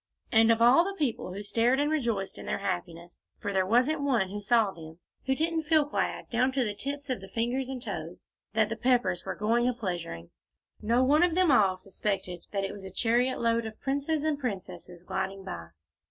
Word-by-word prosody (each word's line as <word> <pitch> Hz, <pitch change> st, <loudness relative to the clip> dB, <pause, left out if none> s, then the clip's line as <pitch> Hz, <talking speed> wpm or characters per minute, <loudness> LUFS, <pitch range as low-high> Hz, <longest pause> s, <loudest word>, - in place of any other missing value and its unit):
And 225 Hz, 0 st, +6 dB
of 230 Hz, 0 st, +3 dB
all 250 Hz, +8 st, +7 dB
the 395 Hz, +2 st, -4 dB
people 250 Hz, -, -1 dB
who 200 Hz, +3 st, -6 dB
stared 235 Hz, +5 st, +2 dB
and 295 Hz, +1 st, +1 dB
rejoiced 230 Hz, -10 st, -1 dB
in -, -, -9 dB
their -, -, -1 dB
happiness, 175 Hz, -3 st, -5 dB, 0.2 s
for 205 Hz, -, -4 dB
there 190 Hz, -1 st, +2 dB
wasn't 255 Hz, +8 st, +3 dB
one 245 Hz, -9 st, +1 dB
who 205 Hz, +2 st, -5 dB
saw 220 Hz, -1 st, +3 dB
them 160 Hz, -2 st, -11 dB, 0.3 s
who 265 Hz, -, +2 dB
didn't 320 Hz, +1 st, -1 dB
feel 310 Hz, -1 st, +4 dB
glad, 290 Hz, -, -2 dB
down 250 Hz, +3 st, +2 dB
to 265 Hz, -1 st, +2 dB
the 210 Hz, -3 st, -1 dB
tips 280 Hz, +5 st, -4 dB
of 245 Hz, -, -2 dB
the 195 Hz, -, -9 dB
fingers 245 Hz, +5 st, -1 dB
and 255 Hz, -2 st, -5 dB
toes, 175 Hz, -5 st, -6 dB, 0.3 s
that 220 Hz, -1 st, +2 dB
the 225 Hz, -, -2 dB
Peppers 240 Hz, -8 st, +1 dB
were -, -, -3 dB
going 230 Hz, +3 st, +1 dB
a 250 Hz, -, -2 dB
pleasuring, 170 Hz, -, -5 dB, 0.5 s
no 235 Hz, +4 st, +2 dB
one 290 Hz, +4 st, +4 dB
of 350 Hz, -2 st, +3 dB
them 365 Hz, -4 st, +4 dB
all 195 Hz, -7 st, +4 dB
suspected 185 Hz, -2 st, -3 dB
that 200 Hz, -1 st, -2 dB
it 195 Hz, -, -2 dB
was 200 Hz, -, -9 dB
a 190 Hz, -, -7 dB
chariot 240 Hz, +6 st, +1 dB
load 230 Hz, -1 st, +1 dB
of 215 Hz, -, -10 dB
princes 285 Hz, +3 st, -1 dB
and 310 Hz, -2 st, 0 dB
princesses 180 Hz, -7 st, -6 dB
gliding 195 Hz, +1 st, -3 dB
by. 85 Hz, -, -7 dB
230 Hz, 210 wpm, -28 LUFS, 190-265 Hz, 0.5 s, all